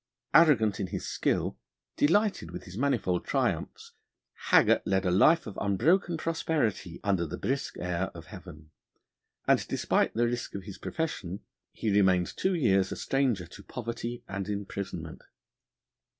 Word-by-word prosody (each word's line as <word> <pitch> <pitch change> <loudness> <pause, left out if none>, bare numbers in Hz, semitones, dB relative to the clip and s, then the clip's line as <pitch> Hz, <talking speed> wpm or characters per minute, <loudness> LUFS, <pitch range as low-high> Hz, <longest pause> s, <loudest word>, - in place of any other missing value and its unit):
Arrogant 125 - +5
in 95 - -1
his - - -5
skill, - - -1 0.4
delighted 195 - +2
with 90 +1 -7
his 90 - -11
manifold 120 -8 0
triumphs, - - -2 0.6
Haggart - - +5
led 95 0 0
a 90 - +2
life 155 - +5
of 105 - -7
unbroken 165 - +2
prosperity 150 - -1
under 95 -4 +1
the 85 +2 -5
brisk 135 +7 -2
air 90 +1 -1
of 85 -1 -9
heaven, 80 -3 -12 0.8
and, - - +3
despite - - +1
the 120 +1 +3
risk 120 -2 -3
of 100 - -5
his 95 -2 -9
profession, 100 - -4 0.3
he 110 - -2
remained 95 -3 +3
two 190 0 +1
years 95 - +2
a - - -3
stranger 130 -9 0
to 85 - -13
poverty 120 0 -5
and 100 0 -4
imprisonment. 100 -5 -5
100 Hz, 145 wpm, -29 LUFS, 90-135 Hz, 0.8 s, Arrogant